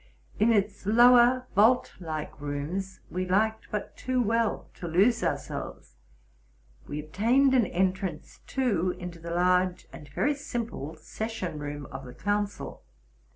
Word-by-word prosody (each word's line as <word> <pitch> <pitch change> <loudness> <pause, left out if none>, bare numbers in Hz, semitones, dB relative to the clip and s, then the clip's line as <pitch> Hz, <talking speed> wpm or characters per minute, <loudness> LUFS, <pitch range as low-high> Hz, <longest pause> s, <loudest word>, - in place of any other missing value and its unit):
In 220 +3 +5
its 200 -2 0
lower 245 +3 +6
vault 220 +6 +4
like 155 -4 -5
rooms 150 +7 -4
we 185 +1 -1
liked 220 +4 +1
but 210 -1 -4
too 255 0 -1
well 230 -1 +1
to 175 - -6
lose 195 +9 +3
ourselves. - - -4 0.9
We 145 - -4
obtained 230 - +2
an 245 -6 +4
entrance, 185 -2 -2
too, 200 -10 0
into 180 -1 -7
the 170 +1 -7
large 180 +1 +2
and 150 - -11
very 290 - +1
simple 235 - -5
session 190 -1 -5
room 145 -1 -5
of 135 +1 -7
the 125 - -10
council. 205 +2 -2
190 Hz, 135 wpm, -28 LUFS, 165-230 Hz, 0.9 s, lower